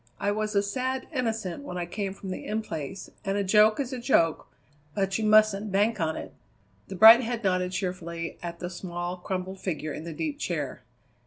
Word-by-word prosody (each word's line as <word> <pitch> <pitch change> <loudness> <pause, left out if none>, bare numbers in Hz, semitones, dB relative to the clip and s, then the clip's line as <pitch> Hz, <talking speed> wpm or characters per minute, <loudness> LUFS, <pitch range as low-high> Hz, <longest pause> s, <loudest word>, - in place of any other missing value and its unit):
I 205 - +1
was 215 0 -2
a 200 - +4
sad 255 +5 -2
innocent 225 - -2
when 180 -10 -6
I 175 - -2
came 195 +2 -3
from 195 -1 -7
the - - -5
In 215 +1 -2
Place, 165 +1 -6
and 195 -1 -1
a 200 - +1
joke 210 +4 +5
is 270 -1 -2
a 255 - -4
joke, 170 - +2 0.5
but 195 0 0
you - - -1
mustn't 215 -1 +4
bank 205 +3 +2
on 160 -1 0
it." - - -7 0.5
The - - -7
bright 225 +5 +10
head 240 -1 -3
nodded 185 -1 +1
cheerfully 170 -3 -4
at 170 -1 -5
the 175 +1 -5
small, 175 0 -5
crumpled 185 +1 -4
figure 155 -5 -3
in 155 - -6
the 170 - -6
deep 290 - -3
chair. - - -3
195 Hz, 200 wpm, -27 LUFS, 180-220 Hz, 0.5 s, bright